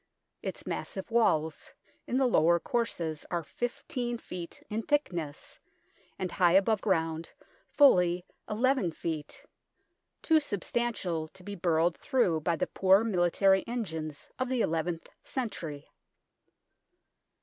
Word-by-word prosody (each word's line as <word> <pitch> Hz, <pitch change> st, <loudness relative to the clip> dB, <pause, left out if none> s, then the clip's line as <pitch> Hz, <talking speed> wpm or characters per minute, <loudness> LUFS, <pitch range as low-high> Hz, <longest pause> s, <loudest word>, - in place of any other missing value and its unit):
Its -, -, -5 dB
massive 190 Hz, +4 st, -5 dB
walls 160 Hz, -9 st, +1 dB, 0.4 s
in 250 Hz, -, 0 dB
the 265 Hz, -, +3 dB
lower 170 Hz, -8 st, +4 dB
courses 170 Hz, -9 st, -2 dB
are 170 Hz, -1 st, -1 dB
15 245 Hz, -, -3 dB
ft. 180 Hz, -6 st, -8 dB
in 215 Hz, +2 st, -2 dB
thickness, 175 Hz, -, -2 dB, 0.6 s
and 185 Hz, -1 st, -3 dB
high 175 Hz, -2 st, +4 dB
above 195 Hz, +2 st, +4 dB
ground 165 Hz, -4 st, 0 dB, 0.4 s
fully 180 Hz, -, +5 dB, 0.2 s
n 210 Hz, -, -2 dB
ft. 175 Hz, -, -1 dB, 0.8 s
too 320 Hz, -1 st, +5 dB
substantial 205 Hz, -, -2 dB
to 180 Hz, +3 st, -17 dB
be 205 Hz, -, -6 dB
burrowed 170 Hz, -2 st, +2 dB
through 240 Hz, -, +2 dB
by 165 Hz, +2 st, 0 dB
the -, -, 0 dB
poor 190 Hz, +2 st, +4 dB
military 190 Hz, -1 st, +3 dB
engines 160 Hz, -11 st, -4 dB
of 255 Hz, 0 st, -1 dB
the 255 Hz, -2 st, +1 dB
eleventh 165 Hz, 0 st, -1 dB, 0.2 s
cen 250 Hz, -5 st, -3 dB
tury. 150 Hz, -7 st, -6 dB
185 Hz, 120 wpm, -30 LUFS, 165-235 Hz, 0.8 s, fully